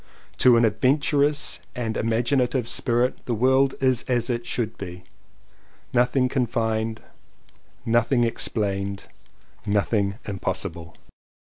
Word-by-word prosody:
To 125 -2 +6
an 115 - +4
adventurous 145 +6 +1 0.2
and 115 -3 -3
imagin 115 +4 +1
ative 125 -1 0
spirit 120 +1 0
the 120 - -1
world 130 +3 +3
is 130 -2 +2
as 125 0 0
it 120 0 -3
should 115 -2 -2
be, 90 -2 -8 0.9
nothing 125 +1 +3
confined, 115 -3 -1 0.8
nothing 120 +2 +2
explained, 100 -4 -2 0.6
noth 100 +2 0
ing 100 -2 +1
impossible. 85 -4 -4
120 Hz, 110 wpm, -24 LUFS, 110-125 Hz, 0.9 s, To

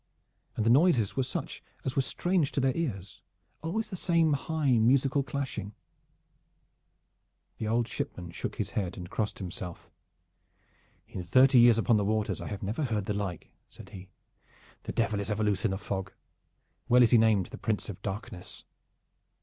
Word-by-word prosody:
And 110 - -1
the 115 - +5
noises 130 - +4
were 135 - +1
such 130 0 -4 0.2
as 130 - -2
were 135 - +3
strange 170 +3 0
to - - 0
their 130 -1 +1
ears, 100 - -4 0.4
always 215 +8 -3
the - - -3
same 170 -3 +2
high 140 -4 +1
musical 135 +4 +3
clashing. 130 -6 -4 1.8
The 110 - -2
old 115 +1 +1
shipman 85 -2 -5
shook - - -5
his - - -3
head 95 -4 -3
and 90 -1 -8
crossed 105 -2 -2
himself. 90 -2 -7 1.2
"In 90 - -6
thirty 130 +8 +5
years 120 -1 +7
upon 115 0 +3
the 105 - +1
waters 110 +1 -1
I - - -5
have 105 -1 -5
never 110 +10 -1
heard 110 -5 -1
the 105 - -1
like," 100 -4 -4 0.2
said - - -13
he. 95 0 -11 0.8
"The - - -3
Devil 110 -3 0
is 100 - -4
ever 105 0 0
loose 105 -1 0
in 105 - +2
a 95 - -1
fog. 95 -1 -4 0.8
Well 125 +1 +7
is 115 - +4
he 120 - +7
named 110 -4 +3
the - - -8
Prince 110 -2 -1
of 100 - -8
Darkness." 95 -3 -6
110 Hz, 175 wpm, -29 LUFS, 100-135 Hz, 1.8 s, years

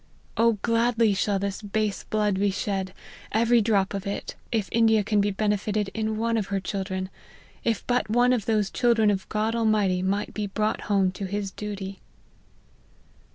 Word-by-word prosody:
O 230 0 +4
gladly 230 -2 +3
shall 200 +1 +1
this 200 +1 -3
base 210 0 -2
blood 210 -3 0
be 200 0 +3
shed, 195 -1 -2 0.4
every 235 +2 +4
drop 200 -3 +1
of 200 0 -4
it, 200 - -4 0.2
if 220 -5 0
India 225 -2 +4
can 210 0 +2
be 205 - +1
benefited 210 0 -1
in 220 -1 -2
one 230 +1 0
of 205 -3 -1
her 200 -1 -1
children; 190 0 -4 0.5
if 225 -3 -1
but 245 -3 0
one 245 +3 +4
of 225 -5 -1
those 210 -3 +1
children 230 -4 +3
of 190 -2 -3
God 215 +1 0
Almighty 210 -5 +2
might 195 +2 -1
be 210 -1 -2
brought 215 +2 -1
home 195 -2 +3
to 195 +2 -5
his 200 0 -3
duty." 200 -2 -6
210 Hz, 170 wpm, -26 LUFS, 195-220 Hz, 0.5 s, O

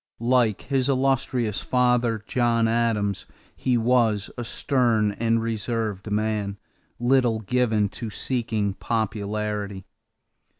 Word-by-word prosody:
Like 120 -4 +2
his 135 -1 0
illustrious 130 -4 +1
father, 125 -3 +1
John 115 -2 +2
Adams, 110 -4 0 0.3
he 125 -2 +1
was 115 -4 +2
a 120 - -4
stern 120 -4 +1
and 115 +2 0
reserved 110 -2 -3
man, 105 -1 -1 0.4
little 120 -2 +2
given 110 -1 +1
to 115 +2 -6
seeking 110 -3 -1
popularity. 105 -2 -3
115 Hz, 100 wpm, -24 LUFS, 105-125 Hz, 0.4 s, Like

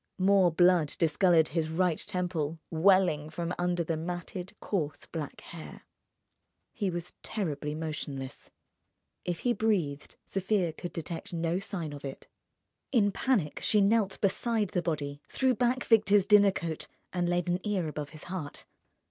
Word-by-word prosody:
More 190 -2 +5
blood 175 -3 +4
discoloured 165 0 +4
his 160 -2 -1
right 170 0 +1
temple, 175 -5 -2
welling 165 -3 +4
from 170 +2 -3
under 175 -1 +1
the 165 0 -2
matted, 175 +3 -5
coarse 155 -8 -2
black 155 -4 -6
hair. 165 -2 -10 0.9
He 205 -5 -1
was 175 -1 -5
terribly 150 -8 -3
motionless. 150 -4 -5 0.8
If 175 -2 -2
he 245 - +2
breathed, 190 -10 -1
Sofia 190 -3 0
could 175 +2 -6
detect 165 +1 -6
no 170 +1 0
sign 180 -7 -4
of 145 - -9
it. 135 -1 -7 0.6
In 210 -6 +4
panic 195 - 0
she 210 - +3
knelt 200 -1 +3
beside 215 +1 +1
the 180 - 0
body, 145 -4 -3
threw 260 -1 +2
back 245 +2 +1
Victor's 205 -3 +5
dinner 205 -1 +6
coat, 165 -4 -4 0.3
and 175 -1 0
laid 175 0 0
an 175 +1 +1
ear 200 -6 0
above 150 -1 -5
his 155 0 -10
heart. 175 -5 -6
175 Hz, 150 wpm, -30 LUFS, 160-195 Hz, 0.9 s, dinner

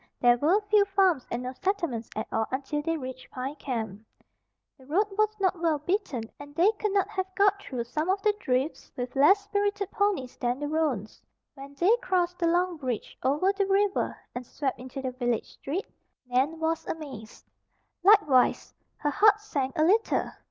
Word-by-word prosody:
There 245 -1 +4
were 335 +9 +4
few 415 0 +4
farms 380 -8 +2
and 240 +1 -3
no 255 +1 -4
settlements 335 - -2
at 215 - -2
all 220 0 0
until 280 +3 -2
they 330 +2 -1
reached 260 -2 -8
Pine 260 +2 -4
Camp. 220 -8 -4 0.8
The 260 - -17
road 370 +9 +2
was 430 +2 +2
not 375 -3 +1
well 325 -3 +2
beaten 305 - -2 0.2
and 285 0 -11
they 360 +7 +5
could 425 - 0
not 395 -1 +2
have 380 -3 -2
got 400 +1 +3
through 250 -10 -4
some 305 +8 -3
of 385 +1 +2
the 425 - +4
drifts 260 -1 -1
with 250 +1 -4
less 385 +9 +5
spirited 405 -1 -1
ponies 400 -12 0
than 245 +1 -1
the 290 - -3
roans. 290 -9 -1 0.3
When 275 0 -11
they 370 +10 +4
crossed 360 -6 0
the 340 - +2
long 350 +1 +1
bridge 255 -6 -4
over 300 +9 +2
the 395 -1 0
river 395 0 +1 0.2
and 245 - -5
swept 265 +2 -3
into 260 +2 -7
the 260 - -2
village 245 -2 -1
street, 335 +9 -4 0.4
Nan 265 +6 0
was 325 0 0
amazed. 265 -9 -7 0.6
Likewise, 360 -11 +4 0.2
her 295 - -1
heart 425 +5 +5
sank 290 -9 -3
a 310 - +4
little. 425 +7 +2
310 Hz, 180 wpm, -27 LUFS, 255-390 Hz, 0.8 s, they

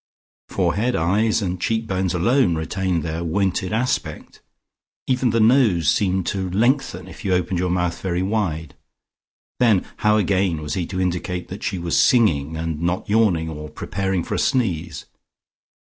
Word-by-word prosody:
Forehead, 120 +5 0
eyes 105 +7 +1
and 90 -2 -3
cheek 115 0 0
bones 95 -3 -1
alone 95 0 +2
retained 85 +1 -1
their 80 +1 -3
wonted 95 +2 -1
aspect; 120 +4 -2 0.6
even 130 -1 +1
the 115 +1 +1
nose 110 - +4
seemed 95 0 +1
to 95 -1 -2
lengthen 105 -3 0
if - - -11
you 95 -2 +1
opened 90 0 -1
your 90 0 0
mouth 90 -1 -1
very 90 -1 -1
wide.... 90 -7 -2 0.9
Then 110 -7 +3
how 105 0 +3
again 95 -4 +1
was 75 -1 -4
he 90 -3 -2
to 95 - -4
indicate 90 0 -2
that 95 +3 -7
she 100 - -2
was 85 -1 0
singing 80 - +3
and 80 -1 -3
not 85 +2 -1
yawning, 100 -7 +2
or 75 -1 -7
preparing 95 +1 -2
for - - -5
a - - 0
sneeze? 90 - -1
95 Hz, 160 wpm, -21 LUFS, 85-105 Hz, 0.9 s, nose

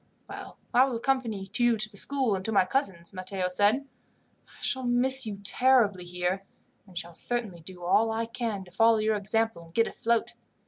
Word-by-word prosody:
"Well, - - -9 0.2
I 250 +2 +6
will 265 -3 -3
accompany 230 -5 -1
you 240 -1 +3
to 215 0 +2
the 215 - -18
school 260 +1 +1
and 190 - -5
to 225 - -1
my 195 -3 +4
cousin's," 185 -7 -2
Matteo 185 0 -2
said. 210 +9 +2 0.6
"I - - -17
shall 260 -2 -1
miss 255 +1 +4
you 205 -2 -5
terribly 215 -5 +3
here, 180 +2 -2 0.4
and 180 -2 -12
shall 170 0 -5
certainly 220 -2 -3
do 180 +2 -11
all 215 +6 +3
I 225 +1 -1
can 230 -4 -4
to 180 - -17
follow 225 +4 +4
your 215 0 +1
example, 215 -2 -1
and 165 - -19
get 230 - +4
afloat. 235 0 -1
220 Hz, 190 wpm, -27 LUFS, 185-240 Hz, 0.6 s, I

